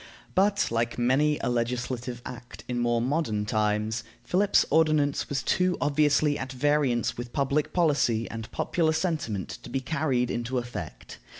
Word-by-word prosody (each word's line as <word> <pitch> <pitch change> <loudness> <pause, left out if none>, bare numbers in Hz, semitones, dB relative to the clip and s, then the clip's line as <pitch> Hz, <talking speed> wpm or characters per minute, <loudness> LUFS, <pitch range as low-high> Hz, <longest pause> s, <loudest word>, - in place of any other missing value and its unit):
But, 200 - +2
like 115 0 -1
many 135 +5 +2
a - - 0
legislative 120 0 -2
act 120 -1 -9
in 125 -1 -2
more 120 -1 +2
modern 125 -7 0
times, 105 +1 0 0.2
Philip's 200 +2 +3
ordinance 155 -3 +2
was 140 -1 -1
too 180 -1 +1
obviously 145 0 +2
at 130 0 -5
variance 135 -2 +1
with 120 0 -6
public 140 +1 0
policy 140 -10 +2
and 115 -1 -7
popular 160 -2 +1
sentiment 155 - -2
to - - -10
be 135 - -1
carried 130 -3 0
into 120 +2 -2
effect. 90 - -6
130 Hz, 145 wpm, -27 LUFS, 120-150 Hz, 0.2 s, Philip's